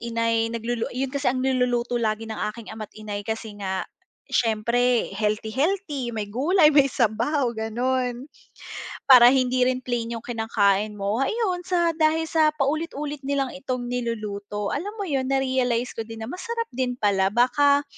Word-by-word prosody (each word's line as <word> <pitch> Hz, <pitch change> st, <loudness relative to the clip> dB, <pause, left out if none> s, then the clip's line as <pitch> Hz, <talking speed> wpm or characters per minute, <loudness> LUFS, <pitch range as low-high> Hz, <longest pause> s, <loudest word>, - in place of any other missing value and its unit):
ina'y 230 Hz, -1 st, 0 dB
naglulu 230 Hz, 0 st, -3 dB
'yun 260 Hz, +1 st, -3 dB
kasi 280 Hz, 0 st, 0 dB
ang 255 Hz, +1 st, 0 dB
niluluto 245 Hz, -2 st, +1 dB
lagi 220 Hz, 0 st, -1 dB
ng 220 Hz, -1 st, -6 dB
aking 225 Hz, 0 st, -10 dB
ama't 215 Hz, -1 st, -8 dB
ina'y 210 Hz, -1 st, -5 dB
kasi 220 Hz, +1 st, -4 dB
nga, 190 Hz, -1 st, -2 dB, 0.5 s
siyempre 235 Hz, +2 st, +1 dB
healthy-healthy, 260 Hz, -, -1 dB
may 215 Hz, -, -1 dB
gulay, 300 Hz, -, +3 dB
may 280 Hz, -1 st, +5 dB
sabaw, 240 Hz, +3 st, +1 dB
gano'n. 245 Hz, +3 st, -1 dB, 0.8 s
Para 245 Hz, -2 st, +9 dB
hindi 255 Hz, -1 st, +2 dB
rin 255 Hz, 0 st, -2 dB
plain 235 Hz, -1 st, -2 dB
'yung 230 Hz, -, -9 dB
kinakain 215 Hz, -3 st, +1 dB
mo, 205 Hz, +4 st, -1 dB
ayon 375 Hz, -, 0 dB
sa 345 Hz, -2 st, +2 dB
dahil 315 Hz, 0 st, +2 dB
sa 315 Hz, -1 st, +3 dB
paulit-ulit 295 Hz, 0 st, -2 dB
nilang 275 Hz, -2 st, 0 dB
itong 255 Hz, -2 st, -3 dB
niluluto, 210 Hz, -4 st, -3 dB
alam 405 Hz, +9 st, -4 dB
mo 405 Hz, -, -3 dB
'yun 270 Hz, -7 st, -1 dB
narealize 260 Hz, -3 st, 0 dB
ko -, -, -6 dB
din 225 Hz, -1 st, -7 dB
na 225 Hz, -, -6 dB
masarap 460 Hz, +5 st, -4 dB
din 250 Hz, 0 st, -2 dB
pala, 200 Hz, -4 st, +2 dB
baka, 280 Hz, +6 st, +3 dB
245 Hz, 155 wpm, -24 LUFS, 225-275 Hz, 0.8 s, Para